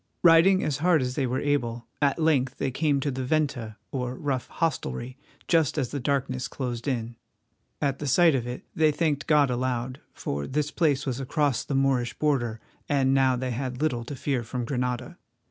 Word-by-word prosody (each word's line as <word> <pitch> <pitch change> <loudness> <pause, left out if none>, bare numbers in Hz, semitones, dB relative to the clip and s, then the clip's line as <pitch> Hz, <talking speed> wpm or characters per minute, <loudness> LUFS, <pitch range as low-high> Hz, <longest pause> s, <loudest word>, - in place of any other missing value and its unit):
Riding 175 +3 +6
as 145 -2 -1
hard 165 -3 +3
as 125 0 -2
they 135 -1 0
were 130 +2 -1
able, 120 -5 -1 0.2
at 140 -1 +3
length 140 -5 +1
they 135 - -1
came 145 +1 +1
to 145 - -1
the 130 0 -3
venta, 125 -6 -1
or 125 -1 -3
rough 135 -3 -2
hostelry, 130 - -2 0.3
just 160 -4 +2
as 130 -5 0
the 145 - -3
darkness 130 -1 -1
closed 120 -2 -4
in. 120 -3 -2 0.6
At 140 -2 0
the 145 - -3
sight 165 +4 +5
of 125 -3 -1
it 125 +1 -6
they 155 -1 +3
thanked 150 -2 -1
God 145 -4 +4
aloud, 125 +1 -2
for 70 0 -4
this 150 +1 -1
place 145 -6 +1
was 130 -2 -2
across 140 -1 0
the 140 - -3
Moorish 135 -3 +1
border, 120 -7 0 0.3
and 135 -2 +3
now 135 -1 +4
they 130 0 -2
had 125 +1 -3
little 145 -6 0
to 140 - -6
fear 135 -1 -1
from 120 +1 -4
Granada. 125 +5 -3
135 Hz, 190 wpm, -26 LUFS, 125-145 Hz, 0.6 s, Riding